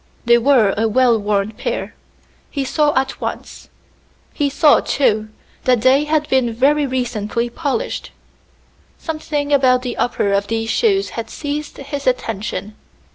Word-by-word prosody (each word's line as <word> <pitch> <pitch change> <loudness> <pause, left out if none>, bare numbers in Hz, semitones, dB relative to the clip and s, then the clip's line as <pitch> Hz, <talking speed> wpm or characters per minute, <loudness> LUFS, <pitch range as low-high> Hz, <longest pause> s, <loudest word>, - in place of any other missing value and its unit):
They 235 0 +5
were 235 -6 +4
a 225 +2 +1
well 245 +1 +3
worn 205 0 0
pair, 215 - -4 0.6
he 275 -2 -3
saw 295 +2 +2
at 265 - -4
once; - - -6 0.6
he 290 -2 0
saw, 295 +1 +4
too, 215 -6 0 0.4
that 250 -3 +3
they 265 +4 +4
had 300 0 0
been 245 -4 +1
very 285 +4 +2
recently 240 -2 -2
polished. 325 - -3 0.9
Something 300 -2 -3
about 255 -2 +4
the 245 -2 -4
uppers 200 -4 0
of 200 0 0
these 225 0 -2
shoes 400 -4 +2
had 225 -1 -6
seized 295 +2 -5
his 280 0 -6
attention. 215 -4 -2
255 Hz, 140 wpm, -18 LUFS, 225-290 Hz, 0.9 s, They